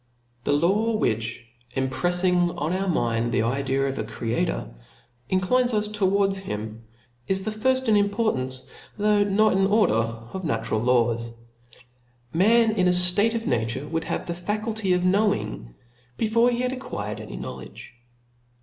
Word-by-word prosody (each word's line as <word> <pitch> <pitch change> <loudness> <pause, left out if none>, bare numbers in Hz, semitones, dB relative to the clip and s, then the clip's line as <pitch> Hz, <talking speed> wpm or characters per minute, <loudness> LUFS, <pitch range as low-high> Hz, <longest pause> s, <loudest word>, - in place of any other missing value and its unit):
The - - +1
law 200 +9 +2
which 115 - -2 0.3
imprefling 175 +6 +1
on 155 +4 -1
our 195 +1 -1
minds 120 -8 0
the 110 - +1
idea 135 +3 0
of 135 0 -3
a - - -1
Creator 105 - -3 0.6
inclines 240 +6 +2
us 210 0 +1
towards 200 -1 +1
him, 110 - -6 0.4
is 190 0 0
the 215 - -2
£rft 260 +4 +1
in 220 - +4
importance, 200 - 0 0.3
though 210 0 +3
not 205 +2 +3
in 195 0 +3
order, 210 - +3
of 115 +8 -3
natu 115 -10 -2
ral 110 - +2
laws. 115 -1 +1 1.0
Man 225 +6 +4
in 185 -4 +1
a - - +4
ftate 180 +6 +4
of 230 0 -3
nature 120 - -1
would 165 +1 -3
have - - -3
the 170 - -3
faculty 210 +2 -2
of 180 0 +1
knowing, 190 - 0 0.4
before 230 +2 +3
he 240 0 -1
had 250 0 0
acquired 105 - -5
any - - -8
knowledge. - - -9
180 Hz, 150 wpm, -24 LUFS, -, 1.0 s, in